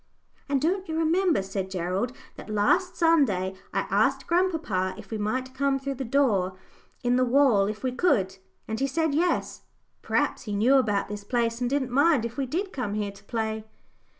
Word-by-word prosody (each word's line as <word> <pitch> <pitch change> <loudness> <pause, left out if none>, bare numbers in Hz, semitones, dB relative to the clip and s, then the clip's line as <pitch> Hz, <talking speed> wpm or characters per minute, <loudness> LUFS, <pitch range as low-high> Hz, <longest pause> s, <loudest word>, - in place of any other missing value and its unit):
"And 280 -1 +2
don't 370 +5 -1
you 320 - -2
remember," 330 - +2
said 190 0 -4
Gerald, 185 +6 -2 0.2
"that - - -11
last 210 - +2
Sunday 265 - +2 0.2
I - - 0
asked - - +2
grandpapa 320 - 0
if 210 -2 -12
we 220 - -3
might 255 +5 -2
come 275 +1 +1
through 275 +1 -4
the 265 0 -5
door 220 -8 +1 0.5
in 245 0 +2
the 255 - +3
wall 245 -6 +4
if 215 +2 -5
we 255 - 0
could, 235 - +1 0.3
and 220 0 -3
he 275 - +1
said 320 +2 0
'yes'? 345 +4 0 0.4
P'r'aps - - 0
he 210 -2 -3
knew 245 +7 +4
about 210 -6 +1
this 205 0 -6
place, 230 +1 -1
and 245 - +1
didn't 265 -2 -1
mind 280 -2 +3
if 235 0 -5
we 275 -2 -2
did 370 +8 -3
come 215 -6 -3
here 205 -1 -2
to 200 0 -17
play." 220 -1 -2
245 Hz, 190 wpm, -26 LUFS, 205-285 Hz, 0.5 s, wall